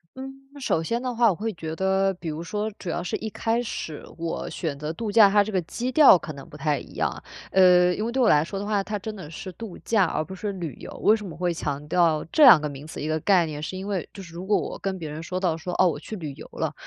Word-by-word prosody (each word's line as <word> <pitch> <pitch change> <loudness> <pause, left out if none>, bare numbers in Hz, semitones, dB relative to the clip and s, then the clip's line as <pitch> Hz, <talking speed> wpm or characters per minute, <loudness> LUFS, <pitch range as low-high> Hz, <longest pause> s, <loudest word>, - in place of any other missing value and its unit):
嗯， 265 +1 -7 0.3
首 205 -11 0
先 230 +8 -1
的 250 -1 -3
话， 230 -1 +5
我 190 - 0
会 220 +4 -3
觉 160 -2 -6
得 190 +1 +2
比 175 -2 -6
如 155 +1 -4
说 210 +4 -2
主 180 - -6
要 175 - -2
是 175 - -3
一 220 - -5
开 225 +3 -1
始， 160 -9 -5
我 165 0 -4
选 155 -5 -4
择 150 +2 -4
度 210 +6 -4
假， 205 -1 +7
它 205 +1 +4
这 215 - -5
个 190 -3 +1
基 240 +9 -4
调 285 -7 +8
可 160 -2 -7
能 140 +4 -11
不 150 - -11
太 150 -1 0
一 - - -12
样。 - - -2 0.3
呃， 180 -1 +6
因 210 - -3
为 235 - -2
对 260 +2 0
我 240 - +5
来 150 -6 +5
说 195 +4 -5
的 200 - -4
话， 205 -1 0
它 210 +1 -3
真 215 +2 -6
的 185 -7 -9
是 175 +4 -7
度 200 +1 -9
假 210 -5 +2
而 155 - -2
不 190 - -9
是 200 +2 -4
旅 170 -7 -5
游。 - - -9
为 215 - +6
什 215 - -7
么 165 -4 -8
会 175 -1 0
强 145 -2 -4
调 160 -2 +2
这 310 - +5
两 240 - +10
个 150 - -3
名 140 0 -8
词？ - - -8
一 150 - -3
个 155 0 0
概 180 +1 +4
念 150 -2 -6
是 185 +4 -5
因 190 +2 -6
为， 195 -4 -3
就 195 - -10
是 170 -2 -13
如 175 +2 -7
果 210 - +4
我 - - -5
跟 195 -1 -3
别 160 -4 -6
人 150 +2 -6
说 180 +3 -4
到 180 -4 +1
说：” 175 +2 -5
哦， 185 - +5
我 155 - -1
去 220 - -7
旅 155 -8 -6
游 - - -11
了。 - - -2
180 Hz, 315 characters per minute, -25 LUFS, 160-210 Hz, 0.3 s, 两